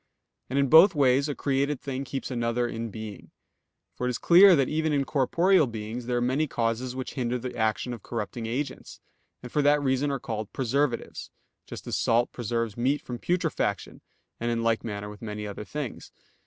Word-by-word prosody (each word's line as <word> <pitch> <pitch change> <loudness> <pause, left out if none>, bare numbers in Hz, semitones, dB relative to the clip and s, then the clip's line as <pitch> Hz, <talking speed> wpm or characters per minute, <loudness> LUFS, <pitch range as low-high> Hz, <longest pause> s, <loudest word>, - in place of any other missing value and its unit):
And 130 - -2
in 140 0 +3
both 165 +7 +7
ways 140 0 +3
a 145 - -2
created 140 0 0
thing 135 -1 -4
keeps 135 0 -5
another 120 0 0
in 115 -1 -4
being. 110 -2 -8 0.7
For 125 - -2
it - - +1
is 125 - -2
clear 185 +2 +7
that 135 -4 +2
even 155 0 0
in 140 -1 +1
corporeal 165 +5 +3
things 115 +1 -6
there 125 -1 0
are - - 0
many 130 +6 +1
causes 120 +1 -2
which 130 -1 -5
hinder 125 -2 -1
the 125 +1 -6
action 110 +2 -1
of 115 - -8
corrupting 115 +1 -5
agents, 130 +4 -4 0.4
and 125 - -8
for 150 - +2
that 145 +1 +4
reason 135 0 +1
are 140 - -1
called 110 -3 -5
preservatives; 130 0 -1 0.4
just - - -8
as - - -2
salt 120 +1 +2
preserves 115 -2 -2
meat 135 +5 +1
from 120 -1 -6
putrefaction; 165 - -1 0.4
and 120 - -1
in 115 -1 -1
like 115 -1 +1
manner 105 -2 -5
with 105 0 -10
many 105 -1 -5
other 105 +1 -6
things. 145 -2 -6
125 Hz, 195 wpm, -27 LUFS, 115-140 Hz, 0.7 s, both